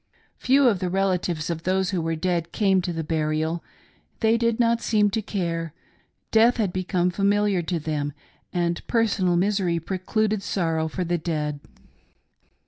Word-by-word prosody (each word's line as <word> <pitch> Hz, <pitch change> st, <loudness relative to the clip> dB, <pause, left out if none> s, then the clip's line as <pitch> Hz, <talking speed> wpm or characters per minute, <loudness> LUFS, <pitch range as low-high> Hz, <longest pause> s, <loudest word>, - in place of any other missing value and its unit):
Few 270 Hz, +1 st, +4 dB
of 205 Hz, -6 st, +2 dB
the 180 Hz, -, -1 dB
relatives 180 Hz, -4 st, 0 dB
of 165 Hz, -1 st, -4 dB
those 190 Hz, +2 st, 0 dB
who 180 Hz, -3 st, -1 dB
were 165 Hz, 0 st, -1 dB
dead 170 Hz, 0 st, -1 dB
came 195 Hz, -3 st, +2 dB
to 180 Hz, 0 st, -3 dB
the 165 Hz, -1 st, -3 dB
burial 155 Hz, +1 st, -1 dB, 0.3 s
— -, -, -38 dB
they 225 Hz, 0 st, +4 dB
did 230 Hz, 0 st, +1 dB
not 230 Hz, -1 st, +2 dB
seem 210 Hz, -3 st, +2 dB
to 220 Hz, +2 st, -1 dB
care 165 Hz, -6 st, -3 dB, 0.3 s
— -, -, -45 dB
death 230 Hz, +3 st, +5 dB
had 205 Hz, -6 st, 0 dB
become 180 Hz, -1 st, 0 dB
familiar 200 Hz, 0 st, +2 dB
to 170 Hz, 0 st, -2 dB
them, 150 Hz, -2 st, -2 dB, 0.4 s
and 175 Hz, -1 st, -1 dB
personal 210 Hz, -6 st, +2 dB
misery 185 Hz, -3 st, +1 dB
precluded 205 Hz, +4 st, -1 dB
sorrow 165 Hz, -5 st, -1 dB
for 180 Hz, +4 st, -3 dB
the 175 Hz, 0 st, -1 dB
dead. 150 Hz, -3 st, -2 dB
180 Hz, 165 wpm, -24 LUFS, 165-205 Hz, 0.4 s, death